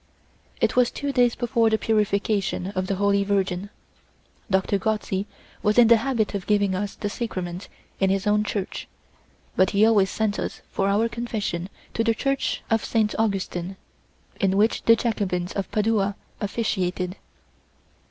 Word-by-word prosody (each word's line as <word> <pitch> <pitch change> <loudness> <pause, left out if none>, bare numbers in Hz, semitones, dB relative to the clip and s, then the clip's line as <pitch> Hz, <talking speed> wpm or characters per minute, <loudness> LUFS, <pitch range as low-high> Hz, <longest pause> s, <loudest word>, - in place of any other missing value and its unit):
It - - +1
was 250 -1 +4
two 285 -1 -3
days 245 -3 +3
before 235 -2 +2
the 220 - +2
Purification 205 -3 0
of 185 -2 -2
the 195 - 0
Holy 200 +1 +2
Virgin. 195 -1 -1 0.8
Doctor 190 +1 +1
Gozzi 210 -2 -1 0.3
was 210 +1 +1
in 235 -2 +7
the 235 - +8
habit 230 -3 0
of 200 -2 -4
giving 205 -2 +2
us 200 +2 -3
the 205 - -3
sacrament 185 -5 -4 0.3
in 195 - +3
his 195 +1 0
own 210 0 +3
church, 200 -2 -4 0.7
but 185 - +4
he 210 - +6
always 205 -4 +4
sent 215 -1 -1
us - - -4
for 195 - 0
our 210 +3 +2
confession 215 -7 -3 0.2
to 225 - +1
the 230 0 +2
church 275 +3 -1
of 225 -1 +2
Saint 215 -2 +1
Augustin, 195 -3 -1 0.6
in 195 0 +2
which 215 +2 +2
the 230 - +7
Jacobins 190 -6 -1
of 195 - -3
Padua 210 -2 +1 0.2
officiated. 190 -4 -1
205 Hz, 155 wpm, -24 LUFS, 195-225 Hz, 0.8 s, the